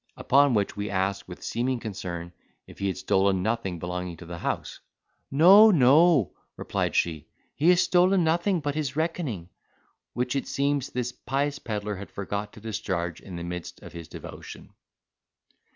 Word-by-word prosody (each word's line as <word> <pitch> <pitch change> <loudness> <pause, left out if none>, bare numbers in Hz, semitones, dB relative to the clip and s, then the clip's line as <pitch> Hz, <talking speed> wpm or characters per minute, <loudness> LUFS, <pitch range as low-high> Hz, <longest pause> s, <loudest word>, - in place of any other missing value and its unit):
Upon 140 -1 +4
which 100 -2 0
we 105 +1 -3
asked, 100 0 -1
with 90 - -10
seeming 125 +2 -1
concern, 90 -6 -6 0.3
if - - -15
he 100 - -1
had 95 - -2
stolen 95 -1 +1
nothing 110 -5 -1
belonging 90 0 -5
to 85 - -11
the 85 0 -7
house. - - -3 0.5
"No, 190 +9 +8
no," 150 - +5 0.2
replied - - -2
she, 80 -3 0 0.3
"he 150 +8 +2
has 180 0 +5
stole 180 0 +4
nothing 170 +2 +1
but 145 -1 -2
his 150 -2 -3
reckoning;" 155 - -2 0.6
which, 125 +2 -1
it 135 - -2
seems, 140 -1 0
this 125 -1 -3
pious 140 +3 -2
pedlar 105 -2 -4
had 100 - -8
forgot 100 +1 -4
to 110 - -12
discharge 95 -6 -3
in 95 - -9
the 85 - -5
midst 90 -1 -7
of - - -11
his 85 -2 -8
devotion. - - -10
110 Hz, 165 wpm, -26 LUFS, 90-145 Hz, 0.6 s, No